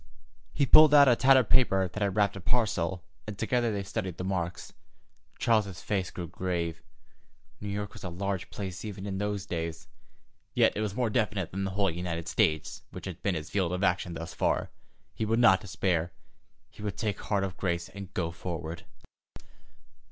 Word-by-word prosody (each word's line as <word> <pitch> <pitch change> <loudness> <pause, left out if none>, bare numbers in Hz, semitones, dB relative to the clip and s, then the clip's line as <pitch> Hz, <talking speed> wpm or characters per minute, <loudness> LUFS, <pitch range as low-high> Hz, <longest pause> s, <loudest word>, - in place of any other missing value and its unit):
He 140 - +2
pulled 155 +2 +8
out 140 -1 +9
a 125 - +6
tattered 130 -2 +5
paper 95 -7 +4
that 100 +4 -7
had 100 -2 +1
wrapped 100 -1 +2
a 100 - -7
parcel, 95 -6 0 0.2
and 105 -2 -6
together 120 +1 +1
they 100 -2 -2
studied 95 -2 -4
the - - -4
marks. 90 -2 -3 0.6
Charles's 105 -5 +1
face 95 -4 -1
grew 90 -2 -6
grave. 85 -1 -3 0.8
New 105 - -5
York 100 0 -4
was 105 - -11
a 90 - -3
large 95 +1 -3
place 95 -3 -6
even 100 -3 -6
in 95 -1 -3
those 105 -1 -2
days. 85 -2 -4 0.7
Yet - - +4
it 105 - -1
was 105 -2 -2
more 120 -3 0
definite 105 -6 0
than 95 +1 -2
the - - -1
whole 100 -3 +3
United 85 -1 -4
States, 80 -1 +1
which - - -9
had 90 -3 -7
been 100 -3 0
his 75 -1 -5
field 95 -4 +1
of 90 +2 -2
action 90 -2 +1
thus 85 0 -6
far. - - 0 0.4
He - - -3
would 110 +1 +1
not 105 -6 +6
despair. 90 -3 -1 0.6
He - - -13
would 105 -2 -4
take 105 -2 -2
heart 100 -2 0
of 95 -1 -3
grace 85 -3 -1
and 100 -1 -9
go 85 -3 -1
forward. 85 -1 -6
95 Hz, 190 wpm, -29 LUFS, 85-105 Hz, 0.8 s, out